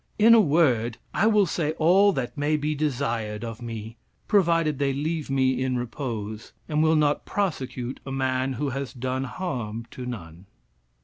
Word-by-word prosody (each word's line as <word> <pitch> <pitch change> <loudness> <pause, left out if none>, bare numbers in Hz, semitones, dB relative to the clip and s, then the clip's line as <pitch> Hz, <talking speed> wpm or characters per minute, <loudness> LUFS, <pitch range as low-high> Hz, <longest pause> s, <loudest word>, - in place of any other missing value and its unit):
In 225 +2 +7
a 230 - +8
word, 130 - +2 0.2
I 215 - +3
will 210 -3 +4
say 155 -2 -1
all 185 +6 +5
that 130 -2 -3
may 150 +1 +1
be 150 +1 -1
desired 120 -7 -2
of 115 0 -6
me, 115 -1 -7 0.3
provided 165 -7 +2
they 140 -1 +1
leave 155 +2 -2
me 130 -1 +2
in 130 -1 0
repose, 115 -3 -5
and 150 0 +1
will 160 0 +4
not 150 -1 +2
prosecute 135 -10 -3
a 135 - -7
man 130 0 0
who 140 +3 -2
has 135 0 -4
done 130 +1 -2
harm 120 - -4
to 125 -1 -7
none." 90 -6 -8
135 Hz, 170 wpm, -25 LUFS, 120-155 Hz, 0.3 s, a